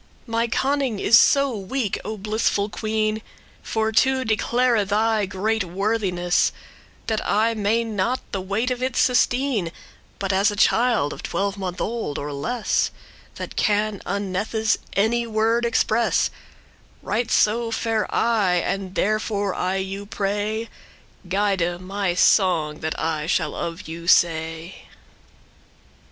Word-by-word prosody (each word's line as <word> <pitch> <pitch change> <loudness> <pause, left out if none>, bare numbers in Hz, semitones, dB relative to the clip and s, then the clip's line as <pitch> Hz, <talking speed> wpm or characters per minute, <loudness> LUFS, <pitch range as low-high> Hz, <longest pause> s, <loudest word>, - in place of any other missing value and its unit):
My 230 0 0
conning* 265 -1 0
is 235 +4 +6
so 275 -3 +3
weak, 210 +2 -2
O 215 - -5
blissful 210 0 0
queen, 215 0 -1
*skill, 220 - -12
ability - - -26
For 220 0 -1
to 260 +3 +2
declare 235 +1 +2
thy 210 +1 +1
great 210 +3 -1
worthiness, 185 -1 0 0.5
That 220 -1 -1
I 220 +3 +2
not 225 +2 0
may - - -26
the 195 - -2
weight 205 +7 -1
of 250 0 -3
it 255 -1 -1
sustene; 245 -6 +2 0.5
But 195 -1 -2
as 195 +3 +3
a 205 - -4
child 225 -7 +2
of - - -9
twelvemonth 195 -2 -3
old, 225 -10 -3
or 145 0 -4
less, 225 - 0 0.5
That - - -7
can 210 -1 +1
unnethes* 205 +3 -1 0.2
any 235 +4 +1
word 225 +2 +1
express, 230 0 +2
*scarcely - - -26 0.7
Right 230 +3 -1
so 230 +2 +2
fare 225 -1 -1
I; 215 -6 +2
and 185 +2 -2
therefore, 205 -1 0
I 185 +1 -1
you 195 +1 -4
pray, 210 +3 -2 0.6
Guide 190 -3 0
my 190 -1 -2
song 170 -6 +3
that 160 0 -3
I 155 -2 -2
shall - - 0
of 170 +3 -5
you 165 +1 -7
say. 165 0 +1
210 Hz, 135 wpm, -23 LUFS, 190-230 Hz, 0.7 s, is